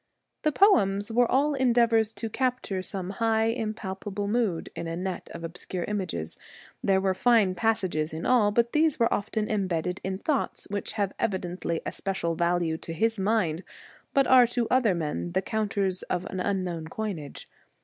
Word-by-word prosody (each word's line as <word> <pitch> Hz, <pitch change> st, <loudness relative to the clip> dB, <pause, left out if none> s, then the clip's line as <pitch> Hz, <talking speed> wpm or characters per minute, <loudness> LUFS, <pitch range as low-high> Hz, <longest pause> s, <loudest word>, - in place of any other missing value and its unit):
The 305 Hz, -, +2 dB
poems 205 Hz, -, +4 dB
were 240 Hz, +1 st, +3 dB
all 290 Hz, +3 st, +3 dB
endeavours 235 Hz, -4 st, +3 dB
to 225 Hz, -, -4 dB
capture 250 Hz, -5 st, -1 dB
some 185 Hz, 0 st, -4 dB
high, 225 Hz, +1 st, +1 dB
impalpable 205 Hz, -3 st, -4 dB
mood 210 Hz, -6 st, 0 dB
in 170 Hz, -, -4 dB
a 165 Hz, -, -3 dB
net 185 Hz, 0 st, -4 dB
of 170 Hz, -, -8 dB
obscure 175 Hz, +1 st, -5 dB
images. 180 Hz, -, -3 dB, 0.4 s
There 190 Hz, -1 st, +3 dB
were 190 Hz, 0 st, +1 dB
fine 215 Hz, -2 st, +3 dB
passages 185 Hz, -7 st, 0 dB
in 160 Hz, +1 st, -5 dB
all, 235 Hz, -5 st, +4 dB
but 235 Hz, +3 st, +1 dB
these 310 Hz, -1 st, +3 dB
were 230 Hz, -, +3 dB
often 215 Hz, +1 st, -1 dB
em 205 Hz, -3 st, 0 dB
bedded 180 Hz, +1 st, -2 dB
in 190 Hz, 0 st, -2 dB
thoughts 280 Hz, +7 st, -1 dB
which 205 Hz, -1 st, -3 dB
have 200 Hz, -3 st, -1 dB
evidently 180 Hz, -4 st, -2 dB
a -, -, -2 dB
special 190 Hz, -4 st, -2 dB
value 170 Hz, -1 st, +1 dB
to 165 Hz, -, -7 dB
his 225 Hz, +5 st, 0 dB
mind, 190 Hz, -5 st, +1 dB, 0.5 s
but 275 Hz, -1 st, +3 dB
are 250 Hz, -1 st, +7 dB
to 240 Hz, -1 st, -1 dB
other 245 Hz, -7 st, +3 dB
men 170 Hz, +1 st, -3 dB
the 190 Hz, -, +2 dB
counters 200 Hz, -4 st, -1 dB
of 180 Hz, -, -1 dB
an 185 Hz, -, -4 dB
unknown 180 Hz, -4 st, -2 dB
coinage. 170 Hz, -6 st, -5 dB
200 Hz, 170 wpm, -27 LUFS, 180-230 Hz, 0.5 s, are